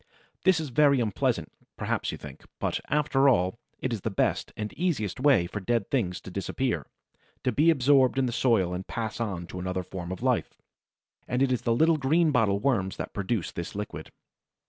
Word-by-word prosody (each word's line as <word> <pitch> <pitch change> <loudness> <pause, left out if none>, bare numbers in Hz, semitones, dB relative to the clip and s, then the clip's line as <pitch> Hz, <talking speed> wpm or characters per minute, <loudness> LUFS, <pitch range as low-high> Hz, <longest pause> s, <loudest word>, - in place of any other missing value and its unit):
This 190 -3 +5
is 155 -3 -4
very 140 +1 +4
unpleasant, 110 -5 0 0.3
perhaps - - -1
you - - -6
think; - - -11 0.2
but, - - -1
after 140 -2 +3
all, 95 -2 +1 0.2
it 130 - -2
is 110 - -3
the 110 - -1
best 100 - 0
and 105 0 -4
easiest 140 - -1
way 130 -10 +4
for 100 +4 -5
dead 110 +1 -1
things 90 -10 0
to - - -9
disappear, - - -2 0.6
to 125 - +2
be 150 +8 +4
absorbed 135 -3 +4
in 135 - +3
the 125 - -1
soil 110 -8 +2
and 90 +1 -5
pass 115 -2 -4
on 100 -7 -3
to 90 +1 -8
another 90 0 -2
form 90 0 -7
of 95 - -6
life. - - 0 0.7
And 125 +2 +1
it 135 - +2
is 125 - 0
the 115 -1 +1
little 160 +5 +4
Greenbottle 135 -9 +2
worms 100 -8 0
that - - -5
produce 100 -1 -2
this 85 +3 -6
liquid. 105 0 -6
115 Hz, 190 wpm, -27 LUFS, 95-135 Hz, 0.7 s, This